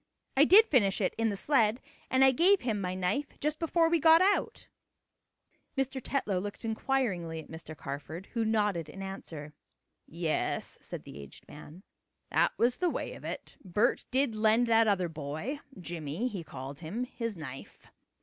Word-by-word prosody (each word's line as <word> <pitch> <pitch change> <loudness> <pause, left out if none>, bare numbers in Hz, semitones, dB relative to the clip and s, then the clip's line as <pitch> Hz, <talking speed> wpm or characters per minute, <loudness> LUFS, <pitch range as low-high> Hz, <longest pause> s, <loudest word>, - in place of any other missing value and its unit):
I 280 +2 +6
did 415 +7 +8
finish 205 - +2
it 190 - 0
in 225 0 +2
the 200 - -3
sled 235 -3 +2 0.3
and 260 +1 +5
I 265 - +7
gave 365 +9 +4
him 220 -5 -1
my 180 -1 -2
knife 190 +11 -2
just 300 +1 -1
before 330 0 +2
we 335 0 +2
got 320 +2 +7
out." 390 +2 +1 1.1
Mr. 270 0 -1
Tetlow 210 -9 -1
looked 205 +3 -6
inquiringly 220 - -1
at 160 - -11
Mr. 160 -1 -9
Carford, 150 +5 -6
who 230 -2 0
nodded 210 -7 0
in 195 +5 -8
answer. 160 -6 -7 0.5
"Yes," 165 -1 -2
said - - -7
the 70 - -10
aged 70 -1 -12
man, 155 +5 -12 0.5
"that - - +3
was 240 +1 +2
the 360 - +1
way - - -4
of - - -12
it. - - -6
Bert 210 +6 +1
did 260 -2 +1
lend 220 +2 +3
that 225 -1 +4
other 190 -4 +2
boy 160 - -5 0.2
Jimmie 170 - -3
he 195 -8 -5
called 135 -1 -8
him 190 +9 -4
his 230 -4 -4
knife. 135 -4 -9
210 Hz, 170 wpm, -30 LUFS, 165-260 Hz, 1.1 s, did